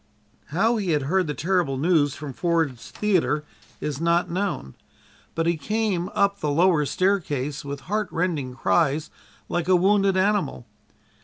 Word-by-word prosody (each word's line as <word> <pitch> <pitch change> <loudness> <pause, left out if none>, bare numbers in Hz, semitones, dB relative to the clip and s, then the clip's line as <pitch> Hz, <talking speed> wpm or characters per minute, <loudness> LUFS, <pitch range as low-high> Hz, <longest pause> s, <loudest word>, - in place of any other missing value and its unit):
How 220 +9 +1
he 190 -6 0
had 145 -2 +1
heard 180 +5 +1
the 150 - -3
terrible 170 -5 0
news 150 -2 +2
from 145 -3 -7
Ford's 160 -6 -1
Theater 180 -7 +1 0.4
is 150 0 -4
not 170 +1 +2
known, 180 - -2 0.6
but 165 - 0
he 170 0 +1
came 210 -1 -1
up 200 0 +2
the 150 - -1
lower 160 -1 +3
stairway 155 -8 0
with 140 0 -6
heartrending 175 -9 -2
cries 155 +2 +1 0.4
like 175 -1 -2
a 185 - +5
wounded 195 +1 +3
animal. 190 - 0
170 Hz, 145 wpm, -24 LUFS, 150-190 Hz, 0.6 s, a